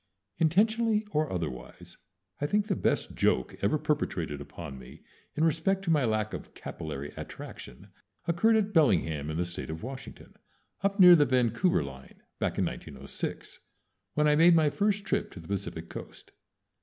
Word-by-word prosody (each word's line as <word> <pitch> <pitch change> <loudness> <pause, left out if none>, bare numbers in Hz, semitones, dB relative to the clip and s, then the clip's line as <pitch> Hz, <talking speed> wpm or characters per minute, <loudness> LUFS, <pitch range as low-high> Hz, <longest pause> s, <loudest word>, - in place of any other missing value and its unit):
Intentionally 215 +6 +3
or 155 0 0
otherwise, 65 -9 -6 0.4
I 145 - 0
think 205 +5 +1
the 200 -3 0
best - - 0
joke 65 - +1
ever 105 +9 +2
perpetrated 95 - -2
upon 70 -2 -8
me 60 - -13 0.3
in 155 - +1
respect 165 +5 +1
to 170 - 0
my 150 -5 +3
lack 110 -1 0
of - - -8
capillary 75 -2 -6
attraction 60 - -9 0.4
occurred 195 +7 +3
at 210 -1 +1
Bellingham, 80 - +2
in 80 - -3
the 90 - 0
State 85 -2 -5
of 80 +3 -6
Washington, 130 +2 -9 0.5
up 200 +1 0
near 180 -2 +10
the 150 -3 +5
Vancouver 125 - +2
line, 65 -1 -11 0.2
back - - -1
in - - +2
1906, - - -5 0.6
when 150 0 +3
I 150 - +5
made 165 +2 +6
my 155 -3 +4
first 205 +2 0
trip - - 0
to - - -9
the 80 - -12
Pacific 95 -4 -4
Coast. - - -10
145 Hz, 165 wpm, -29 LUFS, -, 0.6 s, near